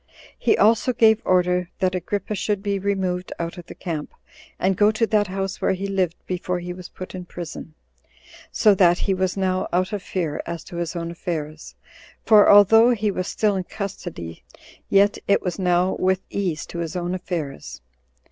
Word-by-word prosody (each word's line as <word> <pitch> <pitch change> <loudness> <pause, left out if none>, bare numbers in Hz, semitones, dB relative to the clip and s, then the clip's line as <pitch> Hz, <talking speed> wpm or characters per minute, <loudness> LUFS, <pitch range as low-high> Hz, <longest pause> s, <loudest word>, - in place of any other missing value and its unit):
He 430 - +2
also 230 +3 +3
gave 220 -1 +4
order 180 -1 +2
that 185 -2 0
Agrippa 195 +3 -3
should 205 -1 -2
be 200 -1 -1
removed 185 -2 -2
out 170 +1 -5
of 175 - -12
the - - -10
camp, 160 -4 -5 0.4
and 190 +1 +1
go 205 +3 +4
to 220 +1 +1
that 210 -2 +1
house 195 0 -4
where - - +2
he 190 +1 -4
lived 190 -4 0
before 180 0 -2
he 175 0 -5
was 180 -1 -10
put 185 - -9
in 180 -1 -7
prison; 165 -2 -8 0.8
so 210 -2 +4
that 175 -2 +4
he 195 - 0
was 185 0 -1
now 185 -1 0
out 185 +3 0
of 205 - -2
fear 175 -5 -3
as 170 -1 -5
to 170 - -9
his 170 +1 -3
own 170 0 -4
affairs; 160 -3 -5 0.5
for 210 -2 +7
although 225 +3 +7
he 215 -4 +1
was 185 -1 -3
still 210 -2 +1
in 190 - -2
custody, 175 - -7 0.5
yet 200 +1 +4
it 200 - +3
was 180 +1 -3
now 180 0 +2
with 190 0 +1
ease 180 -6 -2
to 170 - -7
his 165 -1 -4
own 175 0 -2
affairs. 170 -6 -5
185 Hz, 185 wpm, -23 LUFS, 175-200 Hz, 0.8 s, for